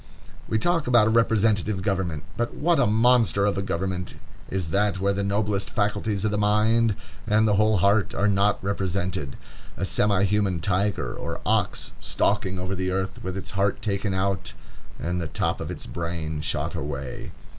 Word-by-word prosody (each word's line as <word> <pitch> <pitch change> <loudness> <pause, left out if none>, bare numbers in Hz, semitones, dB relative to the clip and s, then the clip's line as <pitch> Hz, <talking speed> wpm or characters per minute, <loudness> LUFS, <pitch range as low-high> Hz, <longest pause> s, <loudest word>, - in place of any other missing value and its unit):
We 110 - +1
talk 165 +5 +1
about 120 -3 +5
a 110 - +2
representative 110 -3 +2
government; 95 -6 -1
but 120 0 -2
what 170 +2 +2
a - - +4
monster 115 -2 +4
of 105 - +1
a 95 - -1
government 90 -1 -3 0.3
is 95 -4 -2
that 100 0 +1
where 100 +1 +1
the 100 +1 -1
noblest 100 0 0
faculties 105 -2 -1
of 105 - +1
the 105 - 0
mind, 105 +1 +3 0.3
and 110 +1 +3
the 105 - +3
whole 105 +1 +3
heart, 100 +1 +2
are 100 +2 +2
not 100 0 +3
represented. 95 -7 -2 0.4
A - - -1
semi 100 -2 +2
human 100 -3 +1
tiger 100 +3 0
or - - -5
ox, - - +1
stalking 95 -2 0
over 95 +1 -3
the 95 0 -2
earth, 95 +1 -3
with 95 +1 -4
its 95 - -7
heart 100 +1 0
taken 100 -1 -1
out 95 -1 -1 0.5
and 90 +1 -2
the 80 - -3
top - - -1
of - - -4
its - - -6
brain 85 -2 -4
shot 75 -1 -2
away. 70 -2 -5
100 Hz, 175 wpm, -25 LUFS, 95-105 Hz, 0.5 s, about